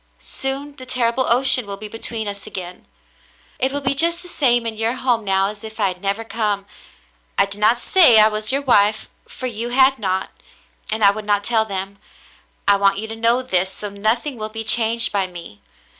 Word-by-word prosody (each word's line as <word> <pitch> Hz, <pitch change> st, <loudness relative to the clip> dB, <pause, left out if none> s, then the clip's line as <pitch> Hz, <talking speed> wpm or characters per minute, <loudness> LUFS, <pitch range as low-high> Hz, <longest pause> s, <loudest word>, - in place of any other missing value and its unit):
Soon 275 Hz, +2 st, -4 dB
the 255 Hz, -, -10 dB
terrible 250 Hz, +1 st, 0 dB
ocean 250 Hz, -2 st, +4 dB
will 200 Hz, 0 st, -6 dB
be 215 Hz, +1 st, -8 dB
between 225 Hz, 0 st, -3 dB
us 200 Hz, -1 st, -6 dB
again. 180 Hz, -1 st, -8 dB, 0.7 s
"It 265 Hz, -, +1 dB
will 285 Hz, +1 st, -3 dB
be 275 Hz, 0 st, 0 dB
just 335 Hz, +5 st, +1 dB
the -, -, -12 dB
same 240 Hz, -8 st, +1 dB
in 225 Hz, -1 st, -3 dB
your 225 Hz, +3 st, -1 dB
home 245 Hz, -3 st, 0 dB
now 195 Hz, 0 st, +1 dB
as 210 Hz, 0 st, -9 dB
if 220 Hz, 0 st, -10 dB
I 200 Hz, -2 st, +2 dB
had 180 Hz, 0 st, -8 dB
never 200 Hz, +3 st, -2 dB
come. 210 Hz, -3 st, -2 dB, 0.7 s
I 195 Hz, -, +4 dB
did 200 Hz, +1 st, -8 dB
not 225 Hz, +3 st, +4 dB
say 245 Hz, -4 st, +5 dB
I 215 Hz, -, +7 dB
was 215 Hz, +1 st, -2 dB
your 275 Hz, +1 st, -1 dB
wife 215 Hz, -4 st, +2 dB
— -, -, -40 dB
for 255 Hz, -, -8 dB
you 235 Hz, -1 st, -4 dB
had 265 Hz, +2 st, +4 dB
not 190 Hz, -2 st, -2 dB, 0.3 s
— -, -, -13 dB
and 220 Hz, 0 st, -1 dB
I 200 Hz, -, +7 dB
would 215 Hz, +1 st, -7 dB
not 205 Hz, -1 st, +1 dB
tell 225 Hz, 0 st, +1 dB
them. 195 Hz, -1 st, -5 dB, 0.7 s
I 200 Hz, 0 st, +5 dB
want 195 Hz, 0 st, +2 dB
you 220 Hz, +2 st, -4 dB
to 225 Hz, -, -6 dB
know 230 Hz, +3 st, +1 dB
this, 190 Hz, -6 st, 0 dB
so 205 Hz, +1 st, -6 dB
nothing 225 Hz, +7 st, -1 dB
will 215 Hz, 0 st, -5 dB
be 225 Hz, +1 st, -6 dB
changed 230 Hz, +1 st, +3 dB
by 195 Hz, -2 st, 0 dB
me. 170 Hz, -, -12 dB
220 Hz, 220 wpm, -20 LUFS, 200-245 Hz, 0.7 s, I